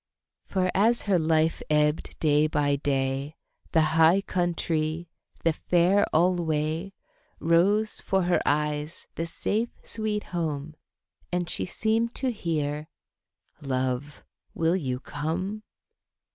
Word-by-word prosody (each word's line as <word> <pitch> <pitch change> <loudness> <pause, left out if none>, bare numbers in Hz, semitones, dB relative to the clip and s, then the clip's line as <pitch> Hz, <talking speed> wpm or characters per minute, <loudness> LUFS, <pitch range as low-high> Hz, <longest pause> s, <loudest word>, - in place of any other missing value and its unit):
For 185 -2 0
as 225 +4 +3
her 195 -4 +2
life 160 0 +2
ebbed 150 0 +1
day 150 -1 +3
by 145 -2 +1
day, 135 +1 -1 0.4
The 160 - +4 0.2
High 170 +5 +6
Countrie, 170 -2 -1 0.3
the 165 - +3
Fair 180 +5 +3
alway, 165 +1 +1 0.5
Rose 195 +6 +2
'fore 190 -1 +1
her 175 0 +2
eyes, 150 +1 -1
the 165 - -3
safe, 220 +7 -1
sweet 215 -2 -2
home, 155 -3 -2 0.6
And 175 -1 -1
she - - -1
seemed 225 +5 0
to 260 -2 0
hear, 150 -7 -2 0.7
"Love, 130 +1 -2 0.3
will 165 +2 +2
you 130 -8 -2
come?" 170 +10 -3
165 Hz, 115 wpm, -27 LUFS, 150-185 Hz, 0.7 s, High